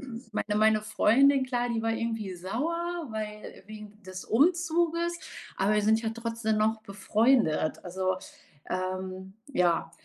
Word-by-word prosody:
m 230 - -7
meine 210 0 -1
meine 215 0 +4
Freundin 260 +6 +4
klar, 245 -1 -1
die 230 -2 -1
war 225 - +1
irgendwie 225 -4 -3
sauer, 330 - -3
weil 210 -2 -7
wegen 210 0 -11
des 185 0 -8
Umzuges, 340 +4 +2 0.4
aber 195 +3 +2
wir 210 - +2
sind 220 +2 +3
ja 220 - -1
trotzdem 230 -1 -2
noch 220 +1 +1
befreundet. 205 -4 +1
Also, 185 +1 -1 0.5
ähm, 185 +1 -4 0.2
ja, 170 -5 +2
220 Hz, 135 wpm, -28 LUFS, 195-250 Hz, 0.5 s, meine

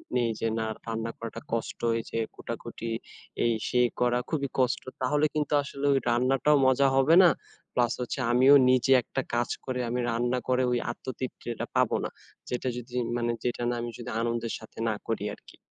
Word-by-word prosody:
নেই 120 -2 +2
যে 115 - 0
না 110 - -1 0.2
রান্না 115 0 -2
করাটা 115 -1 -6
কষ্ট 115 - -3 0.3
যে 115 - -2 0.2
কোটাকুটি 115 - -6 0.5
এই 120 - +3 0.2
সে 125 - +2 0.2
করা 125 0 +3
খুবই 140 -4 -1
কষ্ট। 130 -1 +2 0.2
তাহলে 145 +3 +2
কিন্তু 150 -1 -1
আসলে 140 0 -5
ওই 135 - +3
রান্নাটাও 130 +5 +3
মজা 130 +1 +4
হবে 135 +5 +5
না। 175 - +8 0.5
প্লাস 120 -1 +2
হচ্ছে 125 +2 -3
আমিও 130 +4 +7
নিজে 130 +1 +3
একটা 135 - -3
কাজ 120 0 +1 0.2
করে 130 -1 -2
আমি 125 +1 -1
রান্না 120 +2 0
করে 130 0 +3
ওই 120 - +2
আত্মতৃপ্তিটা 120 -1 -5
পাবো - - +3
না। - - -2 0.4
যেটা 125 +1 -2
যদি 125 +1 -8 0.2
মানে 120 0 0
যেটা 120 0 -1
না 120 - 0
আমি 120 0 -4
যদি 120 0 -7
আনন্দের 115 -1 -1
সাথে 110 - -15
না 110 - 0
করি 115 -2 -1
আরকি। - - -18
125 Hz, 180 wpm, -28 LUFS, 120-130 Hz, 0.5 s, না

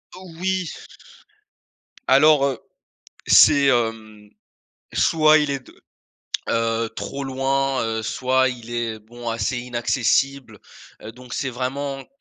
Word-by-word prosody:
Oui. 185 0 -3 1.4
Alors 140 +2 +5
heu, 130 -4 -2 0.7
c'est 140 -1 +6
hem 110 -4 -1 0.6
soit 155 -1 +4
il 150 -1 -1
est 140 -1 -2
de - - -19 0.7
heu, 115 0 0
trop 140 0 -5
loin, 135 0 -1
heu, 110 0 -3
soit 130 +3 +1
il 120 -2 -9
est, 115 -2 -3
bon, 120 +2 -8
assez 115 +2 -2
inaccessible, 125 +2 -1 0.4
heu, 110 - -9
donc 125 0 -12
c'est 135 - -2
vraiment 135 +2 -4
qu - - -27
130 Hz, 120 wpm, -22 LUFS, 115-140 Hz, 1.4 s, c'est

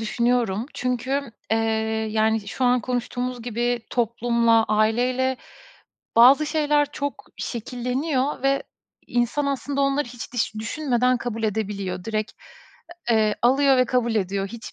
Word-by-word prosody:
düşünüyorum. 235 -1 0
Çünkü, 255 +3 -1 0.3
eee, 225 - +3 0.5
yani, 220 -1 +1
şu 255 - -2
an 250 0 +4
konuştuğumuz 245 0 -3
gibi 240 +1 -1
toplumla, 235 -1 +2
aileyle 245 +5 +1 0.8
bazı 265 +6 +7
şeyler 295 -2 +1
çok 285 -1 -4
şekilleniyor 255 +4 -2
ve 275 0 +2 0.5
insan, 240 +4 0
aslında 280 0 -2
onları 275 -1 +1
hiç 240 -1 -9
diş 220 -2 -1
düşünmeden 250 +2 0
kabul 230 -1 -4
edebiliyor. 200 -4 -2
Direkt, 215 -1 -2 0.8
eee, 215 -2 +3
alıyor 270 +2 +4
ve 255 - +4
kabul 235 -1 0
ediyor. 195 -1 -1
Hiç 230 +2 -9
245 Hz, 120 wpm, -23 LUFS, 225-260 Hz, 0.8 s, bazı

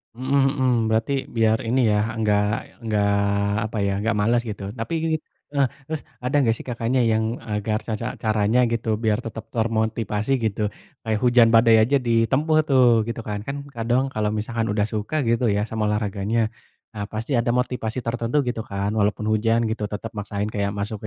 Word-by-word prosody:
Mhm 135 +3 +1 0.2
mhm, 130 -1 +3 0.2
berarti 110 +5 +1 0.2
biar 110 -1 +3
ini 130 +3 +2
ya, 105 - +3 0.2
enggak 105 -2 +2 0.4
enggak 105 -2 +1 0.6
apa 110 - -5
ya, - - +1
enggak 110 +2 0
males, 115 +3 +2
gitu. 105 -1 -6 0.2
Tapi 115 +9 -3 0.6
heeh, 140 -2 +4 0.2
terus 160 -1 -3 0.2
ada 125 +3 -1
enggak 120 -5 +3
sih, - - -10
Kakaknya, 120 +1 0
yang 110 0 +2 0.3
agar 105 +1 0
ca 110 - -1
ca 115 - -2 0.2
caranya, 110 +2 +2
gitu, 115 -1 -2 0.2
biar 110 -1 +2
tetap 115 -1 -6
termotivasi, 110 0 -1
gitu. 110 -1 -1 0.4
Kayak 110 -2 0
hujan 120 -1 +6
badai 115 0 +6
aja 135 +6 +2
ditempuh 130 +7 +2
tuh, 130 -2 +5 0.2
gitu, 115 - -4
kan. 105 -1 -3
Kan 140 - -3 0.2
kadang 120 +3 +1
kalau 105 -1 0
misalkan 115 +1 -2
udah 105 - +1
suka, 110 +8 -3
gitu 115 +1 +2
ya, 105 - +1
sama 110 -1 -1
olahraganya, 105 +1 -1 0.5
nah, 105 -2 -5
pasti 110 +5 -4
ada 120 0 +1
motivasi 125 -2 -2
tertentu, 115 +2 -2
gitu 120 -2 -2
kan, 100 0 -1
walaupun 105 +1 +1
hujan, 115 +2 +2
gitu, 110 -1 -3
tetap 105 +2 -6
maksain 105 0 -3
kayak 100 -1 -1
masuk 105 +2 -3
110 Hz, 175 wpm, -23 LUFS, 105-120 Hz, 0.6 s, hujan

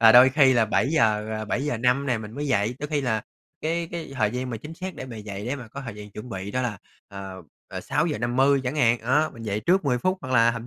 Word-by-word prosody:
rồi 115 -1 +8
đôi 125 +2 +9
khi 135 -1 +5
là 120 -3 +4
7:00, 110 -4 +2
ờ, 110 - -4
7:05 125 +3 0
nè 120 -3 +1
mình 110 -1 -8
mới 145 +4 -4
dậy. 115 -3 +1
Đôi 150 - -4
khi 150 -1 0
là 110 -5 0 0.4
cái 165 +1 -1
cái 165 -4 -5
thời 120 -5 +1
gian 125 +2 -3
mà 115 - -3
chính 150 +9 -9
xác 185 +2 -6
để 130 - -7
mà 120 - -8
dậy 105 -1 -6
để 135 +4 -1
mà 125 -4 -9
có 140 - -7
thời 120 -6 -7
gian 105 0 -10
chuẩn 105 +5 -8
bị 95 -1 -5
đó 130 +4 -1
là, 105 -6 -2 0.3
ờ, 95 -2 -8 0.3
ờ, - - -5
6:50 130 +5 +2
chẳng 130 +4 -2
hạn. 120 -4 +4
Đó, 145 +7 +2
mình 115 - -10
dậy 105 -1 -2
trước 180 - +2
10 125 -3 +2
phút, 185 +7 0
hoặc 130 -3 -5
là 115 -2 +5
thậm 115 0 -6
125 Hz, 265 wpm, -25 LUFS, 110-140 Hz, 0.4 s, đôi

